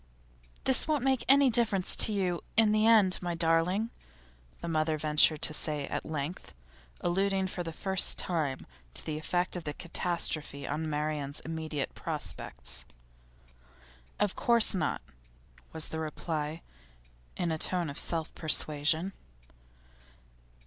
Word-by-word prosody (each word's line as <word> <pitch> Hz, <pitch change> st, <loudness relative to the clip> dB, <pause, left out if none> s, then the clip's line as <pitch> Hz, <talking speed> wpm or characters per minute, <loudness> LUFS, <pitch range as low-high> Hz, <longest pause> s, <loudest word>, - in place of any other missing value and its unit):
'This 265 Hz, +2 st, +3 dB
won't 300 Hz, -5 st, +1 dB
make 265 Hz, -2 st, +2 dB
any 275 Hz, -1 st, +6 dB
difference 220 Hz, -6 st, +1 dB
to -, -, +1 dB
you 185 Hz, -4 st, -1 dB, 0.2 s
in 220 Hz, -2 st, +5 dB
the 215 Hz, +1 st, +3 dB
end, 210 Hz, -5 st, +5 dB
my 175 Hz, -1 st, -2 dB
darling,' 170 Hz, +7 st, +2 dB, 0.7 s
the -, -, -6 dB
mother 155 Hz, -1 st, 0 dB
ventured 155 Hz, +1 st, +4 dB
to 155 Hz, -, +2 dB
say 150 Hz, -2 st, -1 dB
at -, -, -3 dB
length, 155 Hz, +2 st, -5 dB, 0.5 s
alluding 195 Hz, +2 st, +1 dB
for 185 Hz, -1 st, -4 dB
the 165 Hz, -1 st, -4 dB
first 190 Hz, +3 st, +2 dB
time 155 Hz, -7 st, -1 dB, 0.3 s
to -, -, -1 dB
the 155 Hz, -1 st, -3 dB
effect 175 Hz, +4 st, -1 dB
of 175 Hz, -, -5 dB
the 150 Hz, -2 st, -5 dB
catastrophe 160 Hz, -5 st, -1 dB
on 155 Hz, +2 st, -2 dB
Marian's 150 Hz, -1 st, -2 dB
immediate 160 Hz, -3 st, -4 dB
prospects. -, -, -5 dB, 1.4 s
'Of 205 Hz, -2 st, +1 dB
course 235 Hz, -2 st, +3 dB
not,' 160 Hz, -6 st, -1 dB, 0.7 s
was 160 Hz, -1 st, -2 dB
the 160 Hz, -, -4 dB
reply, 155 Hz, 0 st, -4 dB, 0.7 s
in 175 Hz, -2 st, -1 dB
a 160 Hz, -, -2 dB
tone 180 Hz, 0 st, +1 dB
of 140 Hz, -, -5 dB
self 165 Hz, -2 st, -2 dB
persuasion. 155 Hz, +3 st, +3 dB
165 Hz, 135 wpm, -30 LUFS, 155-190 Hz, 1.4 s, any